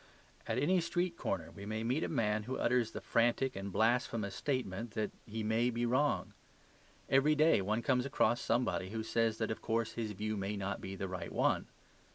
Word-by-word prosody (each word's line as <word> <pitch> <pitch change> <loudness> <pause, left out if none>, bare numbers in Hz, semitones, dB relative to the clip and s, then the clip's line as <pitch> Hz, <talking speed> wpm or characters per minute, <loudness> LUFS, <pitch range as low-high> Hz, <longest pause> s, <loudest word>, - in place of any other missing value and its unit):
At - - -1
any 180 +5 +3
street 175 +1 -1
corner 90 - -3
we 100 - -10
may 110 +1 -2
meet 130 +7 0
a - - 0
man 110 -6 +1
who 130 - -1
utters 120 -2 +2
the - - -7
frantic 120 +3 +2
and 95 0 -5
blasphemous 110 -1 +1
statement 120 -5 -2
that 110 -1 -1 0.2
he 110 0 -4
may 110 +3 +2
be 120 0 -1
wrong. 130 +5 +1 0.7
Every 140 +3 +4
day 155 -7 +5
one 105 +4 -1
comes 130 -3 +2
across 120 -3 +2
somebody 115 -5 0
who 110 +1 -3
says 115 0 +1
that 110 -1 -1
of 110 - -4
course 115 0 0
his 110 -2 -3
view 110 +2 -2
may 100 +1 -2
not 100 0 -3
be 95 - -5
the 95 0 -3
right 90 -1 -5
one. - - +1
115 Hz, 200 wpm, -34 LUFS, 105-125 Hz, 0.7 s, day